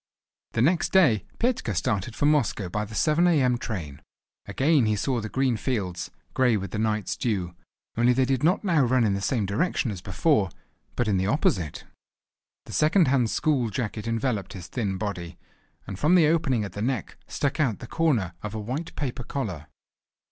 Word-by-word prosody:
The 110 - +2
next 170 +5 +2
day 150 - +4
Petka 230 - 0
started 105 +2 -1
for - - 0
Moscow 140 -10 +1
by 105 +4 -2
the 110 +1 -10
7 160 +7 +3
a.m. 130 -8 +3
train. 80 - -5 0.5
Again 140 -4 +2
he 105 - +2
saw 125 +3 -1
the 105 - -5
green 130 -2 +1
fields, 90 -8 -3 0.2
grey 125 -4 +3
with 100 0 -5
the 105 - -3
night's 110 -1 0
dew, 95 -7 -2 0.4
only 120 +2 +4
they 130 +1 +3
did 130 -1 0
not 180 +7 +3
now 170 -7 +3
run 125 0 +3
in 105 -3 +2
the 100 - -2
same 110 0 0
direction 115 - 0
as 95 -4 -7
before, 110 - +1 0.5
but 120 - 0
in 100 -2 +2
the 95 +1 0
opposite. 120 - 0 0.8
The - - -10
second 155 0 +4
hand 125 -4 +2
school 135 -5 +1
jacket 110 +1 -4
enveloped 115 -4 -1
his 90 -3 -8
thin 95 0 -2
body, 90 -4 -5 0.5
and 95 - -7
from 155 +5 +4
the 170 -3 +6
opening 150 -9 +1
at 100 - -5
the 105 - -5
neck 120 -2 -2
stuck 140 +1 -2
out 130 -9 +1
the - - -9
corner 120 - 0
of 105 0 -5
a - - -3
white 130 +10 -5
paper 130 -3 -3
collar. 95 - -4
120 Hz, 190 wpm, -26 LUFS, 100-140 Hz, 0.8 s, the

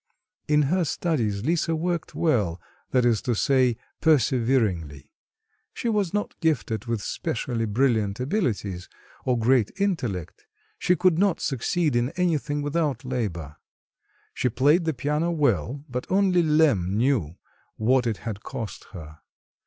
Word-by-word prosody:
In 150 0 +4
her 175 +6 +1
studies 120 - -1
Lisa 165 0 +1
worked 170 +1 -2
well, 105 - +1 0.3
that 125 -2 +2
is 115 -3 +2
to 120 - -1
say 130 0 +2 0.2
perseveringly; 115 - +1 0.6
she 235 - -2
was 205 -6 0
not 205 0 -2
gifted 130 -8 0
with 115 -3 -2
specially 115 -2 -2
brilliant 110 -2 +1
abilities, 115 - -2 0.4
or 125 -1 +2
great 115 -1 +3
intellect; 125 - -2 0.3
she 180 - +3
could 175 -1 +2
not 195 -3 +2
succeed 150 +3 0
in 120 +1 +1
anything 150 -5 0
without 145 -4 -1
labour. 90 - -4 0.8
She 125 - 0
played 150 +9 +3
the 160 - 0
piano 150 +5 0
well, 145 -3 0
but 125 -2 -5
only 190 -2 +3
Lemm 150 - +2
knew 115 - +1 0.4
what 125 +3 +2
it 110 -3 -1
had 105 -3 -4
cost 115 -5 -6
her. 75 -4 -10
130 Hz, 135 wpm, -25 LUFS, 110-160 Hz, 0.8 s, In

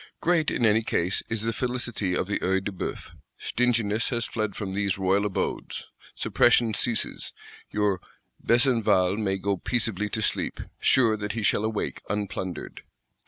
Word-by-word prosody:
Great, 170 -3 +2
in 120 - +1
any 110 +1 +4
case, 90 -4 0
is 110 -1 -2
the 115 0 0
felicity 120 -6 -1
of - - 0
the 100 - -1
Œil 95 +1 +1
de 105 - -3
Bœuf. 95 - -5 0.3
Stinginess 115 -3 +1
has 120 -2 -1
fled 110 -3 -2
from 100 -3 -4
these 100 -1 0
royal 95 +2 +2
abodes: 100 - -3 0.3
suppression 120 -2 +3
ceases; 115 0 0 0.4
your 105 -3 +1 0.4
Besenval 115 -6 +3
may 95 -3 0
go 100 0 -1
peaceably 105 -1 -1
to 110 +1 -2
sleep, - - -1 0.2
sure 115 -4 +4
that 105 0 -3
he 115 -1 -3
shall 105 - +2
awake 110 -1 -2
unplundered. 95 -3 -4
105 Hz, 155 wpm, -26 LUFS, 95-115 Hz, 0.4 s, any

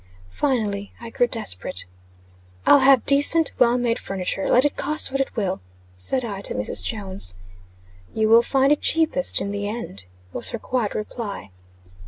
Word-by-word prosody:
Finally, 210 - -2
I 235 -1 -9
grew 245 - +1
desperate. 95 - -4 0.8
"I'll 285 - +7
have 265 -2 +4
decent, 290 +3 +6
well 245 0 +4
made 240 -1 -1
furniture, 195 0 -3
let 255 +3 +4
it 290 - 0
cost 305 -2 -1
what 275 0 0
it 270 - -4
will," 195 -4 -2 0.3
said 240 - -3
I, 200 -3 -6
to - - -3
Mrs. 105 -2 -1
Jones. 190 - -4 0.8
"You 220 0 0
will 230 +1 +6
find 270 +3 +1
it 295 - +2
cheapest 315 -4 +2
in 200 - -3
the 205 0 -3
end," 210 - -7 0.3
was - - -2
her - - -4
quiet 235 -2 -3
reply. 210 - -6
230 Hz, 165 wpm, -22 LUFS, 200-265 Hz, 0.8 s, I'll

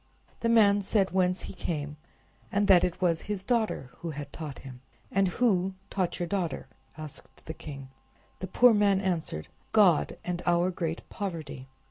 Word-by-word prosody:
The 230 - 0
man 205 -3 +5
said 195 0 +1
whence 185 0 +1
he - - -7
came, 150 -5 -4 0.6
and 205 0 +2
that 185 -3 +7
it 180 -1 -1
was 170 -3 +2
his 200 -2 -4
daughter 220 - 0
who 170 - -5
had 145 -2 -7
taught 150 -4 -6
him. 130 -2 -11 0.3
"And 195 0 +3
who 190 -2 +1 0.2
taught 185 -3 -1
your 175 - -1
daughter?" 170 -7 -2 0.3
asked 155 -2 -10
the 160 - -5
king. 140 -4 -9 0.5
The 185 - -4
poor 245 +5 +6
man 205 -2 +3
answered: 165 - -2 0.3
"God, 195 -7 +4
and 175 -1 -2
our 175 +1 +3
great 165 -2 -4
poverty." 160 -9 -5
180 Hz, 165 wpm, -28 LUFS, 160-200 Hz, 0.6 s, that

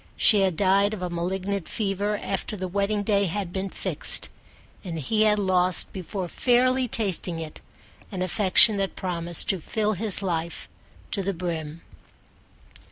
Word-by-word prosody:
She 210 -3 +6
had 185 -4 0
died 200 +3 +2
of 185 - -8
a 180 - -4
malignant 185 +2 -3
fever 205 0 -2
after 200 +2 -4
the 185 0 -4
wedding 200 +2 -1
day 200 -1 +1
had 185 0 -4
been 195 0 -3
fixed, - - +1 0.5
and 170 -4 -6
he 215 +9 0
had 210 -1 +3
lost 185 -3 +1
before 185 0 -5
fairly 255 +5 +1
tasting 190 -6 0
it 160 -2 -8 0.5
an 185 -2 -3
affection 200 +3 +4
that 195 -1 -3
promised 175 -2 -2
to 190 - +1
fill 215 +5 -1
his 200 0 +4
life 170 -2 -3 0.4
to 200 - 0
the 195 +1 -2
brim. 165 -2 -5
195 Hz, 155 wpm, -24 LUFS, 180-205 Hz, 0.5 s, She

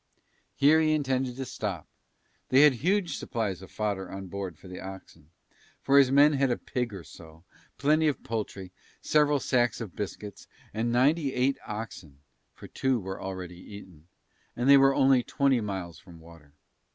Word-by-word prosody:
Here 150 +4 +5
he 155 -1 +2
intended 130 -4 -1
to 135 0 -5
stop, 105 - -5 0.6
they 130 +2 +5
had 150 -2 +7
huge 175 - 0
supplies 105 -6 -3
of 95 - -12
fodder 100 -4 -3
on 95 0 -8
board 95 -4 -6
for 95 - -15
the 90 0 -8
oxen, 95 -5 -11 0.5
for 140 +1 +4
his 135 -2 +5
men 145 +3 +5
he - - 0
had 135 -1 +2
a 120 - 0
pig 125 -2 -3
or 95 -4 -8
so, 80 +3 -15 0.3
plenty 155 +3 +2
of 145 - -2
poultry, 100 -4 -5 0.3
several 150 -1 +3
sacks 120 -4 +1
of 110 -7 -7
biscuits 105 0 -7 0.3
and 115 +2 -1
ninety 140 +4 +2
eight 130 +2 +1
oxen 100 - -7 0.4
(for - - -12
two 130 -2 0
were 95 -1 -7
already 90 -2 -7
eaten), 90 -5 -13 0.5
and 120 +2 -1
they 140 - +9
were 135 0 +4
only 135 -2 +4
twenty 135 0 +1
miles 95 -5 -5
from 85 -4 -15
water. 80 -3 -16
115 Hz, 175 wpm, -28 LUFS, 95-135 Hz, 0.6 s, they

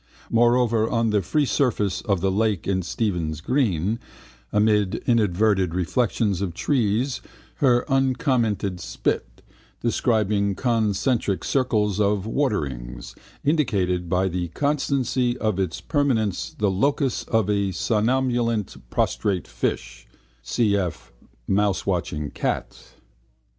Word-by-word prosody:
Moreover, 120 -1 +3
on 115 -2 +1
the 105 -1 +2
free 145 - +1
surface 115 -9 0
of 100 -6 0
the 95 0 +1
lake 105 -1 0
in 95 -1 +1
Stephen's 85 - -2
green 110 - 0 0.5
amid 105 -2 +2
inverted 105 -5 +2
reflections 100 +1 0
of 90 -4 -3
trees 125 - 0 0.4
her 125 -3 +3
uncommented 130 - +1
spit, - - -3 0.4
describing 105 -4 +1
concentric 110 -2 0
circles 105 -7 +1
of 100 -1 +1
waterrings, 70 - -2 0.3
indicated 95 - +1
by 90 +2 +2
the 90 -1 -2
constancy 130 - 0
of 110 -5 -1
its 95 -4 -1
permanence 115 - 0
the 105 -2 +1
locus 135 +6 0
of 110 -4 +1
a 100 -2 +1
somnolent 115 +1 0
prostrate 95 -4 0
fish - - -4 0.4
(cf 95 - -1 0.4
mousewatching 95 -6 0
cat). - - -4
105 Hz, 105 wpm, -24 LUFS, 95-120 Hz, 0.5 s, Moreover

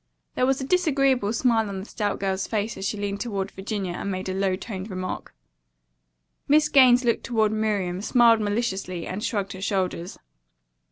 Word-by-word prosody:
There 255 - +1
was 270 0 +2
a - - -3
disagreeable 275 - +2
smile 230 -2 +2
on 195 - -5
the 190 - -6
stout 210 -2 -2
girl's 190 -1 -1
face 215 0 -2
as 195 - -3
she 210 - -3
leaned 200 0 -3
toward 200 -4 -3
Virginia 195 -2 -4
and 200 - -4
made 185 -1 -3
a - - -2
low 190 -1 +1
toned 195 0 -7
remark. 185 -1 -5 1.1
Miss 305 +1 +4
Gaines 255 -3 +6
looked 235 - +1
toward 220 -3 +1
Miriam, 205 -4 -1
smiled 230 0 +5
maliciously, 195 -5 -2
and 195 +3 -5
shrugged 200 -4 -2
her 190 - -9
shoulders. 190 -3 -2
205 Hz, 175 wpm, -25 LUFS, 190-235 Hz, 1.1 s, Gaines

